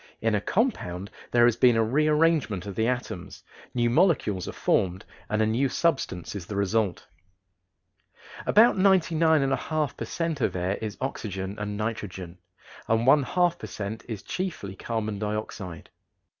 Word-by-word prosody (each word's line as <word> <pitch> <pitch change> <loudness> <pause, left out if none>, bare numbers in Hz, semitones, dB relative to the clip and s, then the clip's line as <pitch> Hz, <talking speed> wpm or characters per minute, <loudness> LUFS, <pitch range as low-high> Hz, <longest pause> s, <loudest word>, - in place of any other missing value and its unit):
In 115 0 +1
a 105 - +1
compound 100 - -1 0.2
there 120 -1 +5
has 120 -2 +4
been 120 0 +5
a 115 - +4
rearrangement 150 - +2
of 100 - -5
the 110 +3 0
atoms, 95 -7 -4 0.3
new 120 -1 +2
molecules 120 - +2
are - - -3
formed, 95 +1 0 0.2
and 110 0 +2
a - - +3
new 120 +5 +1
substance 135 - -1
is 90 -4 -6
the 105 - -5
result. 100 -1 0 1.4
About 220 -1 +5
99 165 -5 +4
1/2 145 +3 -1
per - - -5
cent. 165 -4 -3
of - - 0
air 90 +2 -1
is 110 -2 -4
oxygen 100 -7 -4
and 105 0 -3
nitrogen 95 -5 -5 0.5
and 115 +1 +2
one 145 +3 +6
half 175 +5 +1
per 110 - -6
cent. 105 +2 -5
is 110 -3 -5
chiefly 165 - -4
carbon 110 -1 -3
dioxide. 105 -5 -5
110 Hz, 155 wpm, -26 LUFS, 100-150 Hz, 1.4 s, one